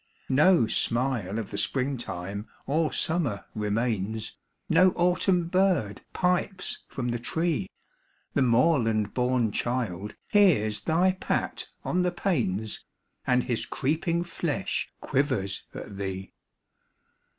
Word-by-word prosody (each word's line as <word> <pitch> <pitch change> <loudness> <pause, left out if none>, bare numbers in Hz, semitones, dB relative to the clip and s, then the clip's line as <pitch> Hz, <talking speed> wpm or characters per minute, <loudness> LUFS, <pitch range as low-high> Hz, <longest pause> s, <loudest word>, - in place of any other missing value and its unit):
No 150 +1 +5
smile 115 -3 0
of 110 -4 -4
the 100 - -1
Spring 135 +4 0
time 100 -2 -5 0.2
or 155 +3 +1
Summer 155 - 0
remains, 110 0 -1 0.3
No 185 0 +5
Autumn 180 0 +2
bird 180 - +1
pipes 180 +1 0
from 125 -3 -3
the 120 0 -1
tree; 160 - -1 0.6
The 140 - +2
moorland 115 -5 +3
born 125 -3 +1
child 105 -5 -2 0.2
hears 145 - +4
thy 175 +3 +3
pat 185 - -2 0.2
on 180 - +1
the 180 0 +1
panes, 110 - -1 0.4
And 125 -1 +3
his 120 -3 -1
creeping 165 +5 0
flesh 175 -1 -2
quivers 130 -9 -1
at 100 - -7
thee. 95 -1 -5
125 Hz, 115 wpm, -27 LUFS, 105-170 Hz, 0.6 s, No